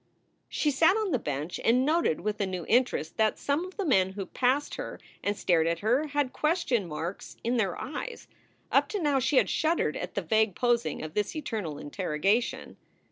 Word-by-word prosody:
She 300 Hz, -, +1 dB
sat 325 Hz, +8 st, +4 dB
on 430 Hz, -4 st, -1 dB
the 255 Hz, -, +2 dB
bench 150 Hz, 0 st, -4 dB
and 250 Hz, +3 st, +4 dB
noted 310 Hz, -, +2 dB
with 210 Hz, 0 st, -2 dB
a 200 Hz, -, +1 dB
new 185 Hz, -2 st, -4 dB
interest 240 Hz, -10 st, +1 dB
that 220 Hz, -1 st, +2 dB
some 285 Hz, +4 st, 0 dB
of 370 Hz, +2 st, -11 dB
the 400 Hz, -, -1 dB
men 190 Hz, -, +3 dB
who 195 Hz, -1 st, -4 dB
passed 260 Hz, +7 st, 0 dB
her -, -, -6 dB, 0.2 s
and 205 Hz, 0 st, 0 dB
stared 165 Hz, -2 st, +2 dB
at 170 Hz, 0 st, -1 dB
her 250 Hz, +9 st, +2 dB
had 285 Hz, -3 st, -1 dB
question 305 Hz, -, +1 dB
marks 165 Hz, +4 st, -6 dB
in 240 Hz, +2 st, +1 dB
their 195 Hz, -6 st, 0 dB
eyes. 315 Hz, -, -6 dB, 0.4 s
Up -, -, +3 dB
to 415 Hz, -, -2 dB
now 290 Hz, -5 st, +2 dB
she 265 Hz, +2 st, +1 dB
had -, -, +5 dB
shuddered 320 Hz, -, +1 dB
at 180 Hz, -, -5 dB
the 200 Hz, -, -1 dB
vague 215 Hz, +2 st, +2 dB
posing 240 Hz, -6 st, 0 dB
of 155 Hz, 0 st, -6 dB
this 210 Hz, -, -1 dB
eternal 215 Hz, -, -4 dB
interrogation. 185 Hz, +8 st, -1 dB
230 Hz, 195 wpm, -28 LUFS, 185-290 Hz, 0.4 s, had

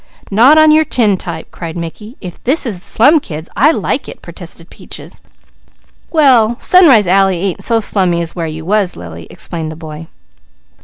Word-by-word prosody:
"Not 245 Hz, +10 st, +5 dB
on 310 Hz, 0 st, +6 dB
your 310 Hz, +1 st, +4 dB
tin 220 Hz, -9 st, +1 dB
type!" 170 Hz, -3 st, -8 dB
cried 165 Hz, -1 st, -8 dB
Mickey. 210 Hz, -, -8 dB
"If 180 Hz, -2 st, -10 dB
this 280 Hz, +5 st, +1 dB
is 200 Hz, -7 st, -4 dB
slum 290 Hz, -, +3 dB
kids, 160 Hz, -, -8 dB
I 280 Hz, +6 st, +4 dB
like 325 Hz, -, -2 dB
it!" -, -, -11 dB
protested -, -, -11 dB
Peaches. -, -, -12 dB, 0.9 s
"Well, 250 Hz, -8 st, +3 dB
Sunrise 295 Hz, -, +5 dB
Alley 190 Hz, 0 st, +2 dB
ain't 190 Hz, -1 st, -3 dB
so 230 Hz, -1 st, +2 dB
slummy 185 Hz, -5 st, 0 dB
as 165 Hz, -, -8 dB
where 170 Hz, -2 st, -3 dB
you 160 Hz, 0 st, -8 dB
was, 200 Hz, -1 st, 0 dB
Lily," 85 Hz, -1 st, -10 dB
explained 160 Hz, -2 st, -5 dB
the -, -, -9 dB
boy. 155 Hz, 0 st, -10 dB
195 Hz, 170 wpm, -13 LUFS, 165-250 Hz, 0.9 s, on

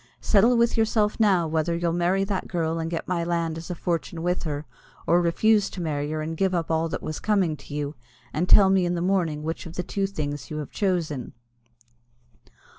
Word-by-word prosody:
Settle 230 Hz, +4 st, +4 dB
with 235 Hz, 0 st, +2 dB
yourself 220 Hz, -1 st, +1 dB
now 190 Hz, -6 st, +3 dB
whether 160 Hz, +1 st, 0 dB
you'll 170 Hz, -1 st, 0 dB
marry 175 Hz, +3 st, +1 dB
that 195 Hz, -1 st, -2 dB
girl 165 Hz, -2 st, -1 dB
and 165 Hz, 0 st, -2 dB
get 165 Hz, -1 st, -4 dB
my 175 Hz, -2 st, 0 dB
land 170 Hz, -1 st, -1 dB
as 165 Hz, 0 st, -8 dB
a 180 Hz, -, -3 dB
fortune 170 Hz, -1 st, -3 dB
with 180 Hz, +1 st, 0 dB
her, 150 Hz, -2 st, -4 dB, 0.4 s
or 175 Hz, +1 st, +4 dB
refuse 205 Hz, +4 st, +3 dB
to -, -, -8 dB
marry 150 Hz, -3 st, -2 dB
her 155 Hz, 0 st, -2 dB
and 160 Hz, +1 st, -4 dB
give 190 Hz, 0 st, +1 dB
up 165 Hz, -1 st, -1 dB
all 160 Hz, +1 st, +1 dB
that -, -, -4 dB
was 155 Hz, -, -4 dB
coming 195 Hz, -7 st, +1 dB
to -, -, -14 dB
you; 145 Hz, 0 st, -2 dB, 0.4 s
and 170 Hz, +5 st, -1 dB
tell 195 Hz, -2 st, +7 dB
me 190 Hz, -1 st, +3 dB
in 175 Hz, 0 st, 0 dB
the -, -, -2 dB
morning 175 Hz, -5 st, 0 dB
which 165 Hz, +2 st, -4 dB
of 165 Hz, -, -10 dB
the 180 Hz, -, -2 dB
two 195 Hz, +1 st, -1 dB
things 145 Hz, -8 st, -4 dB
you 155 Hz, -, -4 dB
have 150 Hz, -2 st, -5 dB
chosen." 170 Hz, -, -1 dB
170 Hz, 215 wpm, -25 LUFS, 160-190 Hz, 0.4 s, tell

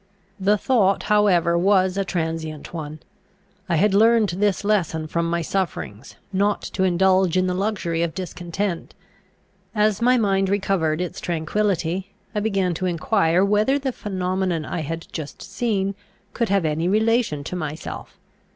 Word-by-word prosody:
The 200 Hz, +2 st, +3 dB
thought 200 Hz, -4 st, +2 dB
however 180 Hz, -5 st, +4 dB
was 185 Hz, +1 st, +3 dB
a 195 Hz, -, 0 dB
transient 160 Hz, -4 st, -4 dB
one. 155 Hz, -2 st, -6 dB, 0.7 s
I 170 Hz, -, +2 dB
had 195 Hz, +5 st, +3 dB
learned 225 Hz, 0 st, +5 dB
this 200 Hz, +3 st, 0 dB
lesson 180 Hz, -6 st, 0 dB
from 165 Hz, +2 st, -1 dB
my 170 Hz, 0 st, 0 dB
sufferings, 165 Hz, -, -4 dB, 0.2 s
not 200 Hz, +2 st, +1 dB
to -, -, -2 dB
indulge 185 Hz, 0 st, +3 dB
in 185 Hz, -, +3 dB
the 180 Hz, -, 0 dB
luxury 185 Hz, -4 st, -1 dB
of 170 Hz, -2 st, -1 dB
discontent. 180 Hz, 0 st, -4 dB, 0.8 s
As 210 Hz, 0 st, +2 dB
my 250 Hz, +2 st, +4 dB
mind 195 Hz, -3 st, +2 dB
recovered 190 Hz, -5 st, 0 dB
its 180 Hz, -, -4 dB
tranquillity, 180 Hz, +2 st, -1 dB, 0.2 s
I 210 Hz, -, 0 dB
began 195 Hz, -4 st, 0 dB
to 185 Hz, +3 st, -2 dB
enquire 175 Hz, +1 st, +2 dB
whether 210 Hz, +7 st, +2 dB
the 275 Hz, -2 st, -2 dB
phenomenon 185 Hz, -5 st, -2 dB
I -, -, -3 dB
had 165 Hz, +2 st, -4 dB
just 155 Hz, -3 st, -6 dB
seen 195 Hz, -1 st, -1 dB, 0.4 s
could 235 Hz, -2 st, -1 dB
have 195 Hz, -3 st, +2 dB
any 155 Hz, +2 st, 0 dB
relation 215 Hz, -6 st, +1 dB
to 180 Hz, -, -5 dB
myself. 155 Hz, -2 st, -6 dB
185 Hz, 150 wpm, -23 LUFS, 170-205 Hz, 0.8 s, learned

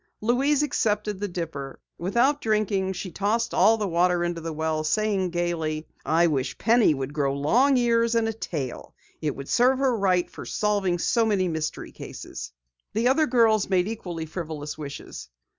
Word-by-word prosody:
Louise 270 Hz, +6 st, +2 dB
accepted 210 Hz, -7 st, 0 dB
the 205 Hz, -, -2 dB
dipper. 160 Hz, -7 st, -6 dB, 0.2 s
Without 240 Hz, +11 st, +2 dB
drinking, 210 Hz, -3 st, 0 dB
she 185 Hz, 0 st, -5 dB
tossed 215 Hz, +6 st, 0 dB
all 220 Hz, +4 st, +5 dB
the 210 Hz, -2 st, -1 dB
water 175 Hz, 0 st, +2 dB
into 175 Hz, -1 st, -2 dB
the 165 Hz, 0 st, -4 dB
well, 155 Hz, 0 st, -1 dB
saying 195 Hz, +2 st, +1 dB
gaily: 165 Hz, -3 st, -2 dB, 0.2 s
"I 165 Hz, +2 st, +3 dB
wish 135 Hz, -5 st, -1 dB
Penny 225 Hz, -8 st, +4 dB
would 135 Hz, +1 st, -4 dB
grow 140 Hz, -2 st, 0 dB
long 245 Hz, -, +3 dB
ears 235 Hz, -1 st, +2 dB
and 230 Hz, -1 st, +2 dB
a 225 Hz, -, -1 dB
tail! 150 Hz, -, -5 dB, 0.3 s
It 150 Hz, -3 st, -1 dB
would 140 Hz, 0 st, -8 dB
serve 255 Hz, +2 st, +3 dB
her 265 Hz, -2 st, +2 dB
right 185 Hz, -4 st, +2 dB
for -, -, -10 dB
solving 200 Hz, -4 st, 0 dB
so 230 Hz, +6 st, +2 dB
many 200 Hz, -4 st, +1 dB
mystery 160 Hz, -2 st, -4 dB
cases!" -, -, -8 dB, 0.4 s
The 230 Hz, +4 st, +2 dB
other 305 Hz, +4 st, +3 dB
girls 225 Hz, -4 st, +3 dB
made 185 Hz, -1 st, +2 dB
equally 180 Hz, -7 st, -5 dB
frivolous 155 Hz, -3 st, -6 dB
wishes. 145 Hz, -, -8 dB
190 Hz, 170 wpm, -25 LUFS, 160-225 Hz, 0.4 s, all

